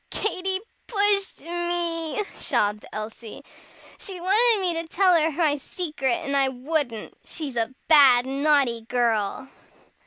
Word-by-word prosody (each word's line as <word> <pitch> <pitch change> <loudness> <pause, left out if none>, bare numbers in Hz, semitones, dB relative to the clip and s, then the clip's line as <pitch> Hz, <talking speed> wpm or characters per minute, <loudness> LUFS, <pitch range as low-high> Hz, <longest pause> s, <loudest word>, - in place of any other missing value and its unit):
"Katy 380 -2 -2 0.3
pushed 405 -2 +1
me," 345 +1 -2
sobbed 210 0 -1
Elsie. 215 +1 -8 0.6
"She 380 -2 -2
wanted 425 +5 +3
me 360 -2 0
to 330 - -11
tell 370 +2 +3
her 320 -1 +3
my 300 -1 +1
secret, 300 -4 -3
and 280 0 -2
I 275 -1 +3
wouldn't. 260 -3 -3
She's 295 -6 -4
a 235 +2 -2
bad, 270 -6 +6
naughty 275 -3 +1
girl!" 235 -1 0
305 Hz, 125 wpm, -24 LUFS, 250-350 Hz, 0.6 s, bad